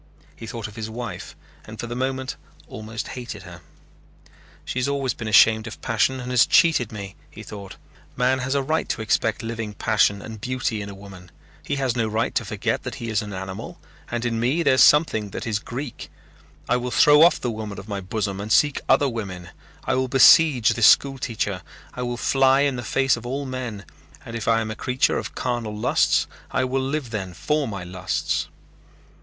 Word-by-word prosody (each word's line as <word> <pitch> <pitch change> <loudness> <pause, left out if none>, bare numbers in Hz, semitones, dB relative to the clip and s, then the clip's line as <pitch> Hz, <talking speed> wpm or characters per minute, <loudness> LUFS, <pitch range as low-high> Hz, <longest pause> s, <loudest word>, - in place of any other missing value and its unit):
He 115 - -9
thought 115 -2 -5
of 105 - -13
his 110 -1 -5
wife 115 -5 -7 0.3
and 110 0 -11
for - - -3
the 120 0 -5
moment 130 +1 -2 0.3
almost 110 +2 -6
hated 125 -2 -7
her. - - -11 1.0
"She 130 - -3
has 125 - 0
always 140 -2 -1
been 115 - -7
ashamed 110 +1 +5
of 110 - -8
passion 115 +4 +1
and 125 0 -5
has 125 -2 +5
cheated 155 - +4
me," 100 -2 -7
he - - -11
thought. 100 -2 -9 0.4
"Man 130 +1 +2
has 130 +2 -2
a 140 - +1
right 155 +4 -1
to 110 - -2
expect 110 - 0
living 115 -2 -5
passion 100 -2 +2
and 110 +1 -9
beauty 125 -3 -2
in 100 - -6
a 100 - -9
woman. 95 -3 -12 0.3
He 145 - -3
has 135 -3 -1
no 115 -2 0
right 110 +2 -1
to - - 0
forget - - -2
that - - -6
he 115 - -6
is 110 -2 +1
an 105 -1 -7
animal 95 0 -7 0.3
and 120 0 -3
in 115 -1 -1
me 135 +9 +1
there 140 - +4
is 130 - +4
something 130 -9 +4
that - - -6
is 110 -2 -1
Greek. 125 +4 -7 0.6
I 125 - +2
will 125 0 -3
throw 150 +4 +6
off 170 +2 +6
the 120 - -2
woman 110 -2 -6
of 100 +1 -9
my 100 -2 -4
bosom 100 0 -3
and 105 +2 -6
seek 145 +3 +3
other 145 - +5
women. 95 -8 -5 0.3
I - - 0
will 130 0 +1
besiege 135 -1 +6
this 115 -2 +5
school 135 -1 +4
teacher. 105 -7 -2 0.3
I 125 - -6
will 120 -1 -3
fly 135 +1 +3
in 140 -2 +1
the 120 - -4
face 135 +3 +1
of 120 - -10
all 140 +3 -3
men 125 -7 -5 0.4
and 115 - -7
if 115 - -5
I 115 0 +3
am 110 -1 -3
a - - -5
creature 125 +3 +1
of - - -7
carnal 120 -4 -3
lusts 105 - +2 0.2
I 130 - 0
will 130 +1 0
live 135 -2 -3
then 95 -5 -4
for 150 -1 0
my 100 -4 -5
lusts." 90 0 -2
115 Hz, 210 wpm, -23 LUFS, 105-130 Hz, 1.0 s, throw